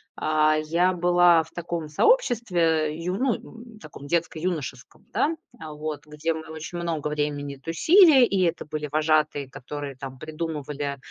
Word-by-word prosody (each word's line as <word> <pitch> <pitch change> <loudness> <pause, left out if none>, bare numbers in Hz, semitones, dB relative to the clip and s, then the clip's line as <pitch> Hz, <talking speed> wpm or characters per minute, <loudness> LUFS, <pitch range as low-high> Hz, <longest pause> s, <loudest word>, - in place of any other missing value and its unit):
а, 155 0 +2
я 175 +4 +2
была 175 -1 +4
в 160 - -19
таком 170 -2 -4
сообществе, 235 - +2 0.3
э, 150 - -5
ю 175 +3 -3
ну, 255 +1 +1
м, 230 -1 -13
таком 150 -4 -12
детско-юношеском, 165 -1 -3
да, 320 +2 +1 0.2
вот, 155 - -7
где 150 +2 -2
мы 160 0 -8
очень 160 +2 -7
много 165 -3 -2
времени 145 -1 -3
тусили. 285 - +5
И 195 -4 0
это 170 -1 -1
были 150 0 -4
вожатые, 155 -2 +1
которые 140 +1 -7
там 130 -1 -8
придумывали, 150 -3 -4
160 Hz, 145 wpm, -25 LUFS, 150-175 Hz, 0.3 s, тусили